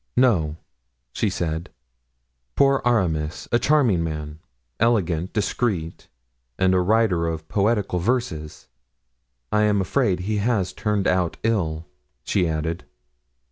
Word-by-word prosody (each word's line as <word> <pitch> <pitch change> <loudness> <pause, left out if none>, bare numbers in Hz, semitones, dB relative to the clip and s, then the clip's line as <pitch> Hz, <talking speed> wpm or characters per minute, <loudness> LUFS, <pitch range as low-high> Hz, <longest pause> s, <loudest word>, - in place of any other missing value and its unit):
"No," 85 -12 +3 0.6
she - - 0
said; 80 +1 -3 0.9
"poor 135 -1 +4
Aramis; 85 -10 0
a 120 - +3
charming 125 - +3
man, 75 -1 -5 0.4
elegant, 95 -7 +1
discreet, 100 -5 -2 0.5
and 95 0 +3
a 95 - +4
writer 95 -3 +2
of 80 -1 -4
poetical 100 -2 +1
verses. 90 -8 -2 0.8
I 105 - +3
am 105 -1 +2
afraid 95 -2 +1
he 105 +3 -1
has 105 -3 0
turned 105 -3 -1
out 90 -2 +1
ill," 85 -8 0 0.4
she 90 -4 +1
added. 80 +2 -2
95 Hz, 115 wpm, -23 LUFS, 80-115 Hz, 0.9 s, poor